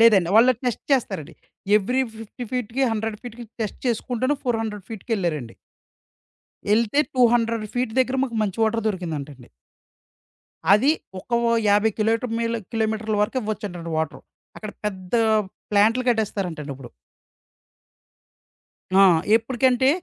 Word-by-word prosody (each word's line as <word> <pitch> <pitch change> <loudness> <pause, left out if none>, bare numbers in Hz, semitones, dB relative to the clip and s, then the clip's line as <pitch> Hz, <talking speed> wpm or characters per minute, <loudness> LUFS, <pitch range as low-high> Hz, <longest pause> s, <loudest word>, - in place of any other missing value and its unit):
లేదండి. 205 -7 +6
వాళ్ళు 240 +3 +7
టెస్ట్ 245 -2 -2
చేస్తారండి. 195 - -1 0.4
Every 250 +6 +1
50 225 +3 -8
ఫీట్‌కి, 250 +1 -1
100 220 -1 -3
ఫీట్‌కి 240 -1 -9 0.2
test 210 - -5
చేసుకుంటును 250 +4 0
400 225 -5 -2
ఫీట్‌కెళ్లారండి. 175 - -3 1.2
ఎళ్తే 230 +5 +2
టూ 255 -2 +4
హండ్రెడ్ 230 -2 +1
ఫీట్ 245 -3 -1
దగ్గర 255 +1 +1
మాకు 235 -4 -4
మంచి 200 +1 -3
వాటర్ 220 0 0
దొరికిందంటండి. 150 - -5 1.3
అది 260 +9 +5 0.3
ఒక - - -18 0.4
50 210 +2 +4
కిలోటమీల 230 +1 0 0.2
కిలోమీటర్ల 220 -1 -1
వరకు 230 +5 -3
ఇవ్వచ్చంటండి 195 -6 -5
వాటరు. 160 -1 -2 0.4
అక్కడ 215 -1 -7
పెద్ద 185 -2 -5 0.6
ప్లాంట్లు 220 +5 +4
కట్టేస్తారంటండి 190 -10 -2
ఇప్పుడు. 130 -2 -11 2.1
ఆ! - - +8 0.3
ఎప్పడికంటే 255 +2 +2
220 Hz, 110 wpm, -23 LUFS, 195-240 Hz, 2.1 s, ఆ